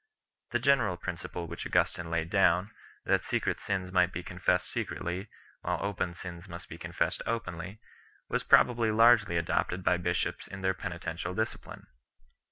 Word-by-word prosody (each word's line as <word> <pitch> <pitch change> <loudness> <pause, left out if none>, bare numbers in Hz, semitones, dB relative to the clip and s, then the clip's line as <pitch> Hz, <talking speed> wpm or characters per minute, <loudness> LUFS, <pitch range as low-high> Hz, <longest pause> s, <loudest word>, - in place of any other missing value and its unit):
The 120 - +1
general 120 -8 +3
principle 85 0 -5
which - - -6
Augustin 90 -3 +1
3 80 - -8
laid 85 0 -1
down, 95 0 +3 0.3
that - - +2
secret - - -1
sins 95 -2 -2
might 90 -1 +3
be 90 - -5
confessed 90 0 0
secretly, 90 +5 -3 0.3
while - - -1
open 95 -3 -2
sins 90 +1 -8
must 85 0 -9
be - - -9
confessed - - -1
openly, 95 -3 -4 0.5
was - - 0
probably 120 -2 +5
largely 110 -4 +5
adopted 85 +2 0
by 90 0 +3
bishops 90 0 -1
in 95 - -8
their 95 0 +2
penitential 85 0 -4
discipline. 110 0 -4
90 Hz, 155 wpm, -30 LUFS, 85-100 Hz, 0.5 s, probably